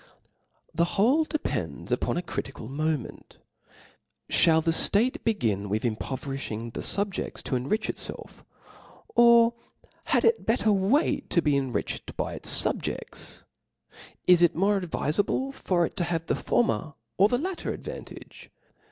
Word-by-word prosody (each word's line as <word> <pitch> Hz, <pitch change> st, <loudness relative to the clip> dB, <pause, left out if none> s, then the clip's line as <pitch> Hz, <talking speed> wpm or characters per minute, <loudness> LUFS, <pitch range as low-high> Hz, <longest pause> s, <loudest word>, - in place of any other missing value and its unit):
The 170 Hz, +4 st, 0 dB
whole 265 Hz, +11 st, +4 dB
depends 310 Hz, -1 st, -4 dB
upon -, -, 0 dB
a 175 Hz, -, -2 dB
critical 135 Hz, -8 st, -6 dB
moment: 150 Hz, 0 st, -3 dB, 0.9 s
(hall 165 Hz, -2 st, +5 dB
the 165 Hz, +1 st, +1 dB
ft^te 215 Hz, +9 st, +1 dB
begin 110 Hz, -, 0 dB
with 105 Hz, +2 st, -1 dB
impoverifliing 120 Hz, -1 st, -4 dB
the -, -, -5 dB
fubjcfts 200 Hz, -1 st, -2 dB
to 130 Hz, -, -2 dB
enrich 175 Hz, -, -1 dB
itfelf? -, -, -5 dB, 0.7 s
Or 235 Hz, 0 st, +6 dB, 0.5 s
had -, -, +2 dB
it 460 Hz, 0 st, +2 dB
better 220 Hz, -1 st, +2 dB
wait 205 Hz, -, +1 dB
to 170 Hz, -, +2 dB
be 150 Hz, -2 st, +2 dB
epriched 130 Hz, -6 st, -3 dB
by -, -, -2 dB
its -, -, -5 dB
fubje(5ts? -, -, -3 dB, 0.8 s
Is 180 Hz, -1 st, +6 dB
it 175 Hz, -, +4 dB
more 195 Hz, +2 st, +2 dB
advifc 160 Hz, -1 st, 0 dB
s^ble 270 Hz, +5 st, -2 dB
for 175 Hz, -9 st, +1 dB
it -, -, -7 dB
to 175 Hz, -, +1 dB
have 165 Hz, -1 st, -2 dB
the -, -, 0 dB
former, 165 Hz, -10 st, 0 dB, 0.2 s
or 200 Hz, -, +7 dB
the 245 Hz, -, +2 dB
latter 360 Hz, +6 st, -3 dB
ad -, -, -7 dB
vantage -, -, -10 dB
175 Hz, 145 wpm, -27 LUFS, 140-225 Hz, 0.9 s, or